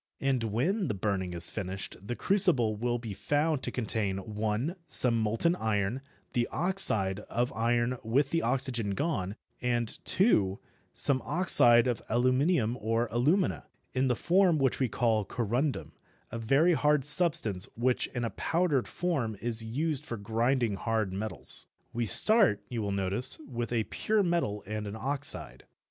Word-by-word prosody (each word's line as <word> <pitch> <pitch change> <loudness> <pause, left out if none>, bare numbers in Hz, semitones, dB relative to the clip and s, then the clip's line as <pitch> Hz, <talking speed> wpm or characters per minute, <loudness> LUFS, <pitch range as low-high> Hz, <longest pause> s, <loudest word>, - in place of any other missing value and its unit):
And 130 -4 0
when 165 - -1
the 105 - -2
burning 95 -2 -2
is 85 0 -1
finished 95 -2 -5
the 105 +5 -5
crucible 165 - +1
will 120 +3 -1
be 115 -3 -7
found 145 +7 0
to - - -3
contain 110 -5 -2
(1) 110 - -3
some 120 -2 +2
molten 115 +11 +1
iron, 110 - -1 0.3
the 120 -1 0
oxide 110 - +5
of 120 +2 -1
iron 120 +2 0
with 135 +5 +1
the 165 - +1
oxygen 120 -5 0
gone, 105 - -2 0.3
and 120 -2 -1
(2) 100 - +2 0.4
some 130 -2 0
oxide 120 -8 +5
of 120 -3 -1
aluminium 125 +1 +1
or 115 +2 0
alumina, 150 - +1 0.3
in 130 0 +1
the 125 - +1
form 180 +3 +3
which 135 -3 0
we 130 -3 +1
call 110 -1 +1
corundum, 120 +7 -2 0.4
a 115 - -5
very 140 +10 +3
hard 150 -3 +2
substance 145 - +3
which 125 +2 0
in 120 - -5
a 115 - -3
powdered 165 -6 0
form 140 - -2
is 115 -1 -2
used 145 +6 -2
for 120 - -6
grinding 115 +1 0
hard 110 -3 -1
metals. 110 +3 -4 0.3
We 120 -1 -2
start, 200 - +4
you 120 -2 -3
will 100 -1 -2
notice, 100 +4 0
with 120 -3 -4
a 115 -2 +1
pure 215 - 0
metal 170 - -1
and 105 +1 -5
an 100 - -6
oxide. 130 - -3
120 Hz, 155 wpm, -29 LUFS, 110-140 Hz, 0.4 s, oxide